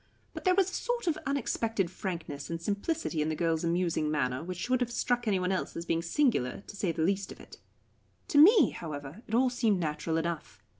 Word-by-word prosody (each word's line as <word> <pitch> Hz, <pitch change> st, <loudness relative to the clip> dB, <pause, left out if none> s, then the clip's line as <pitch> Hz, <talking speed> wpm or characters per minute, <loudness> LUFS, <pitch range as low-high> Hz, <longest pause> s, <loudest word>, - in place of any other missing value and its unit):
But -, -, -8 dB
there 365 Hz, 0 st, +5 dB
was 385 Hz, -1 st, +3 dB
a -, -, -14 dB
sort 485 Hz, +3 st, -2 dB
of 335 Hz, -3 st, +2 dB
unexpected 225 Hz, -8 st, 0 dB
frankness 170 Hz, -6 st, -5 dB
and 165 Hz, 0 st, -3 dB
simplicity 200 Hz, -, -1 dB
in 155 Hz, -, 0 dB
the 155 Hz, -, -1 dB
girl's 165 Hz, 0 st, 0 dB
amusing 170 Hz, -2 st, +1 dB
manner 130 Hz, -2 st, 0 dB
which 180 Hz, +3 st, -4 dB
would 255 Hz, 0 st, +1 dB
have 240 Hz, -1 st, 0 dB
struck 245 Hz, -1 st, 0 dB
any 195 Hz, -3 st, +2 dB
one 180 Hz, +1 st, 0 dB
else 190 Hz, -, -2 dB
as 170 Hz, -, -5 dB
being 165 Hz, -1 st, 0 dB
singular, 195 Hz, -, +1 dB
to -, -, -10 dB
say 195 Hz, -3 st, 0 dB
the 160 Hz, 0 st, -1 dB
least 195 Hz, +3 st, 0 dB
of -, -, -11 dB
it. -, -, -13 dB, 0.7 s
To 290 Hz, -, +4 dB
me, 355 Hz, -, +8 dB
however, 150 Hz, +3 st, -7 dB
it 225 Hz, -, -1 dB
all 255 Hz, +1 st, +4 dB
seemed 225 Hz, -6 st, +2 dB
natural 160 Hz, 0 st, -1 dB
enough. 165 Hz, -1 st, -3 dB
185 Hz, 215 wpm, -30 LUFS, 165-245 Hz, 0.7 s, me